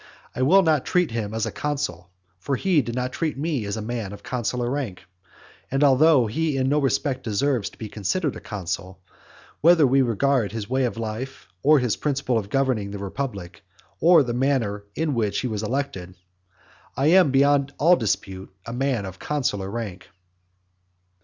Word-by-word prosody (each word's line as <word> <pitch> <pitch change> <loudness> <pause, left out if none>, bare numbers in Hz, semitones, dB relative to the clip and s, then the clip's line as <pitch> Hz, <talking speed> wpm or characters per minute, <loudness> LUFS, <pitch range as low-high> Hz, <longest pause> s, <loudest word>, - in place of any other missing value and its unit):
I - - -3
will 185 +9 +5
not 155 -5 +2
treat 180 -5 +1
him 110 -3 -3
as 110 -1 -1
a - - -3
consul, 140 - -3 0.3
for 135 +9 -1
he 175 +1 +2
did 120 -1 -5
not 125 0 -2
treat 155 -4 -2
me 145 -6 -2
as 100 +2 -3
a 110 - -4
man 110 -3 -4
of 100 - -11
consular 125 0 -2
rank; 125 -9 -3 0.7
and 135 +2 +1
although 140 -1 +5
he 150 +6 -1
in 130 0 +1
no 150 +1 +2
respect 135 -1 0
deserves 120 +1 0
to - - -20
be 110 - -6
considered 130 - -2
a - - -7
consul, 95 -2 -5 0.6
whether 165 -1 +6
we 135 +1 +4
regard 125 -1 +1
his 110 -3 -4
way 130 +1 +1
of 120 - -3
life, 115 +2 -5
or 150 +6 +5
his 125 -5 0
principle 140 -5 0
of 100 -2 -7
governing 130 -6 0
the 100 - -6
republic, 100 -4 -5 0.4
or 165 -2 +6
the 120 -2 -3
manner 120 -6 0
in 160 -2 0
which 105 -4 0
he 130 - -2
was 110 -3 -3
elected, 105 -7 -3 0.8
I 135 - +1
am 180 -4 +6
beyond 140 0 +3
all 170 +4 +5
dispute 95 - -3
a 115 - -6
man 125 -4 -1
of 95 0 -9
consular 115 -10 -2
rank. 100 -4 -6
125 Hz, 180 wpm, -24 LUFS, 105-140 Hz, 0.8 s, whether